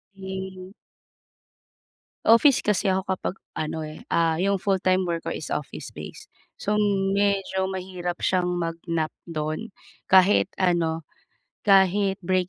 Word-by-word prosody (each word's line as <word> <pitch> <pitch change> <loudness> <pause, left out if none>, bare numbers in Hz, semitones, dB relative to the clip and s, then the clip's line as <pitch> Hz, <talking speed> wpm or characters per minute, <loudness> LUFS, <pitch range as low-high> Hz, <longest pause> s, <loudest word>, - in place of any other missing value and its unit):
eh. 190 0 -7 1.5
Office 230 +4 +5
kasi 210 -1 +1
ako 190 0 +2
kapag 185 - -3 0.2
ano, 155 +1 -3
eh, 155 0 -8
ah, 165 0 +2
'yong 200 +1 +2
full-time 185 -1 +1
work 170 -1 -3
ko - - -1
is 155 - -5
office 150 - -5
base. - - -10 0.3
So, 210 +1 0 0.3
medyo 195 -1 +1
mahirap 180 -2 -4
siyang 180 -1 +2
mag-nap 165 -1 -2 0.2
do'n 155 +7 -3 0.4
kahit 190 +1 +5
ano, 165 -3 +1 0.6
kahit 195 0 +4
break 185 0 +1
185 Hz, 120 wpm, -25 LUFS, 170-195 Hz, 1.5 s, Office